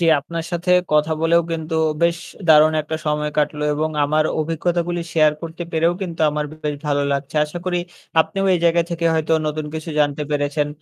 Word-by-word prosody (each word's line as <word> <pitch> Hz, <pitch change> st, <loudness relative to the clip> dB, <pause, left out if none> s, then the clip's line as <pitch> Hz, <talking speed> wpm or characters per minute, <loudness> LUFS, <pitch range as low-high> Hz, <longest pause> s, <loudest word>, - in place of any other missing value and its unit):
জ্বী 170 Hz, -, +2 dB
আপনার 165 Hz, +3 st, -5 dB
সাথে 175 Hz, +2 st, -1 dB, 0.2 s
কথা 150 Hz, +1 st, +3 dB
বলেও 170 Hz, +1 st, +3 dB
কিন্তু 160 Hz, 0 st, -4 dB, 0.3 s
বেশ 170 Hz, 0 st, +3 dB, 0.3 s
দারুণ 155 Hz, 0 st, +7 dB
একটা 160 Hz, +1 st, -4 dB
সময় 150 Hz, 0 st, 0 dB
কাটলো। 150 Hz, 0 st, 0 dB
এবং 155 Hz, +1 st, -1 dB
আমার 155 Hz, +2 st, +2 dB, 0.2 s
অভিজ্ঞতাগুলি 170 Hz, +2 st, -1 dB
শেয়ার 155 Hz, -2 st, +4 dB
করতে 165 Hz, +1 st, -6 dB
পেরেও 165 Hz, +2 st, +2 dB
কিন্তু 170 Hz, -3 st, -5 dB
আমার 150 Hz, 0 st, -2 dB, 0.2 s
বেশ 150 Hz, -1 st, -1 dB
ভালো 145 Hz, -1 st, +1 dB
লাগছে। 140 Hz, +2 st, -4 dB
আশা 150 Hz, +4 st, -7 dB
করি 175 Hz, -1 st, +1 dB, 0.4 s
আপনিও 195 Hz, +4 st, -1 dB
এই 175 Hz, -, +1 dB
জায়গা 170 Hz, 0 st, +4 dB
থেকে 170 Hz, 0 st, -3 dB
হয়তো 160 Hz, 0 st, 0 dB
নতুন 150 Hz, 0 st, -3 dB
কিছু 160 Hz, +1 st, -5 dB
জানতে 145 Hz, 0 st, +1 dB
পেরেছেন। 145 Hz, 0 st, 0 dB
155 Hz, 185 wpm, -20 LUFS, 150-170 Hz, 0.4 s, দারুণ